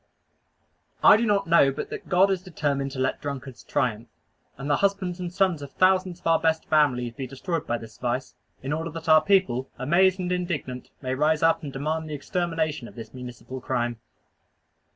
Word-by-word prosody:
I - - +9
do 230 +2 +1
not 205 -1 +2
know 165 -5 +5
but - - -6
that - - -7
God 190 +1 +4
is 190 -2 0
determined 145 -6 -2
to 130 - -6
let 130 - 0
drunkards 140 -3 -6
triumph; 115 -1 -1 0.5
and 135 +1 -6
the 145 - +3
husbands 195 -3 0
and 175 -1 -4
sons 180 -4 +1
of 140 -1 -9
thousands 185 -1 +2
of - - -31
our 165 -1 +4
best 160 0 +1
families 125 -6 +2
be 135 0 -5
destroyed 160 +5 -4
by 120 - 0
this 110 -1 -12
vice, 125 +2 -2 0.3
in 135 +2 -2
order 165 +2 -2
that 165 0 -8
our 155 -1 +7
people, 185 -11 +2
amazed 180 +8 +3
and 180 -1 -2
indignant, 160 -9 -3
may 130 0 -1
rise 150 +3 +2
up 165 0 +4
and 145 -4 -6
demand 155 +4 -3
the 150 - -3
extermination 160 -3 -2
of - - -14
this 115 -2 -9
municipal 125 +1 -8
crime. 120 -2 -2
155 Hz, 195 wpm, -25 LUFS, 130-175 Hz, 0.5 s, I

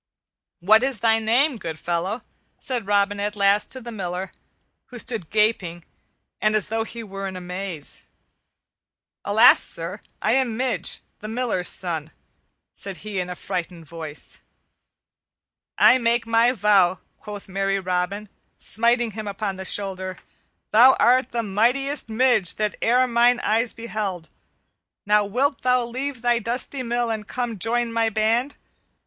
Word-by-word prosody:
"What 215 +5 +6
is 260 -5 +1
thy 225 -1 +4
name, 240 +4 +2
good 165 -4 -5
fellow?" 175 +8 -2 0.3
said 245 -6 -3
Robin 205 0 +1
at 205 +1 -2
last 200 0 +2
to 260 - -5
the 240 -1 -8
Miller, 185 -3 -4 0.6
who 250 - -10
stood 225 -8 -1
gaping 200 -6 0 0.6
and 215 0 +2
as 210 -1 +2
though 225 0 0
he 230 +1 -8
were 195 -1 -6
in 190 - -6
amaze. 180 -3 -4 1.2
"Alas, - - +6
sir, - - -4 0.2
I - - +1
am 255 -4 +1
Midge, 240 -8 -1 0.2
the 215 - -7
Miller's 225 -6 -1
son," 165 -4 -2 0.6
said 195 -3 -4
he 205 -3 -3
in 180 0 -3
a 180 - -5
frightened 175 -3 -5
voice. 155 -1 -7 1.4
"I 260 - +6
make 235 0 +1
my 230 +1 +3
vow," 200 -5 +3 0.2
quoth 205 -2 -9
merry 195 +1 -1
Robin, 185 +3 -2 0.3
smiting 235 +1 +1
him 215 0 -6
upon 200 -1 -3
the 190 - -7
shoulder, 190 -2 -2 0.5
"thou 245 +5 +7
art 255 +1 +4
the 235 -1 -2
mightiest 245 +8 0
Midge 220 -5 +2
that 210 -1 -1
e'er 250 +2 +3
mine 240 0 +3
eyes 225 +2 +1
beheld. 210 -7 -5 0.8
Now 210 0 +3
wilt 260 +7 0
thou 250 -1 +2
leave 255 +1 -4
thy 240 -1 +3
dusty 245 +4 -2
mill 240 -1 -1
and 215 -2 -4
come 245 -2 -3
and 210 -5 -9
join 235 0 0
my 230 -1 +2
band? 225 +6 0
215 Hz, 150 wpm, -23 LUFS, 195-240 Hz, 1.4 s, thou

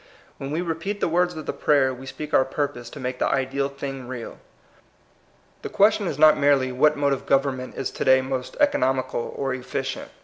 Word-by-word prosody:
When 135 - -5
we 155 +4 -1
repeat 175 +5 -3
liie 165 - 0
words 175 +1 +1
of 155 -2 -7
the - - -3
prayer, 135 -3 +2
we 130 +1 -10
speak 150 +2 -7
our 130 - +5
purpose 130 -3 -4
to - - -10
make 125 0 -4
the - - +2
ideal 135 +1 0
thing 135 -2 -6
real. 125 -2 -7 1.2
The - - -5
question 205 -1 +3
is 145 - -3
not 155 0 +6
merely 140 -2 +3
what 150 +4 +3
mode 140 -1 +2
of 135 - -5
government 135 -2 0
is 135 - -3
to - - -4
day 130 0 +6
most 130 -1 -4
economical 130 - +1
or 135 -1 -1
efficient. 130 +1 -4
135 Hz, 200 wpm, -24 LUFS, 130-150 Hz, 1.2 s, not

